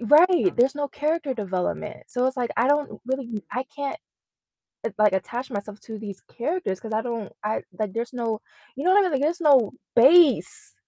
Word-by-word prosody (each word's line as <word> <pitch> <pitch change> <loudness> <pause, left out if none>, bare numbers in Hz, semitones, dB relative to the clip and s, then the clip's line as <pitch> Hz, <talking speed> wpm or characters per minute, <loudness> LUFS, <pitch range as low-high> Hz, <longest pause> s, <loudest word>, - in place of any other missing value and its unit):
right, 345 - +5
there's 255 +4 +3
no 290 0 -2
character 295 -1 -1
development. 195 0 -3
So 250 +1 0
it's 260 +1 -1
like 245 -2 -1
I 240 +3 +3
don't 290 0 0
really 245 -5 -3
I 255 +2 -2
can't, 285 0 -5 0.9
l 225 - -1
like, 210 -2 +4
attach 240 +7 -3
myself 205 +1 -6
to 220 -1 -8
these 205 -3 -8
characters 265 - -3
'cause 225 - -8
I 220 - +1
don't 230 -4 -5
I 215 +1 -1 0.2
like 210 -3 -2
there's 235 +2 -4
no 230 -3 -2 0.3
you 275 - -5
know 365 - +4
what 400 - +6
I - - +5
mean? 365 - 0
Like 275 - +1
there's 335 +4 0
no 270 -9 +5 0.2
base. 285 +5 +5
250 Hz, 200 wpm, -24 LUFS, 220-290 Hz, 0.9 s, what